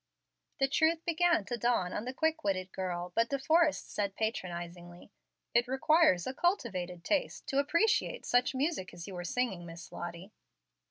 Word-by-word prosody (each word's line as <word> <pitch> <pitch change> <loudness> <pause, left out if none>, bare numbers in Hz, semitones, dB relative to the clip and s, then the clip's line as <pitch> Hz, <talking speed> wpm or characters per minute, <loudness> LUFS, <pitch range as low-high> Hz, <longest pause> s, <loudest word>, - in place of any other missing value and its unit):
The 270 - +4
truth 320 +3 +2
began 340 - +2
to 240 - -3
dawn 230 -6 +1
on 210 - -3
the 255 - -3
quick 320 +3 0
witted 185 -2 -1
girl, 180 -1 -3
but 230 +3 +2
De 275 - 0
Forrest 315 +2 +2
said, 200 -1 -1
patronizingly, 175 -4 -5 0.4
"It 235 +1 +3
requires 265 - +4
a 260 - -3
cultivated 190 - -1
taste 295 - -1
to 275 - +2
appreciate 335 - +1
such 245 +2 +2
music 265 - -1
as 170 -1 -8
you 195 - -8
were 175 -1 -5
singing, 195 -1 -1
Miss 170 0 -10
Lottie." 175 +3 -7
230 Hz, 165 wpm, -32 LUFS, -, 0.4 s, The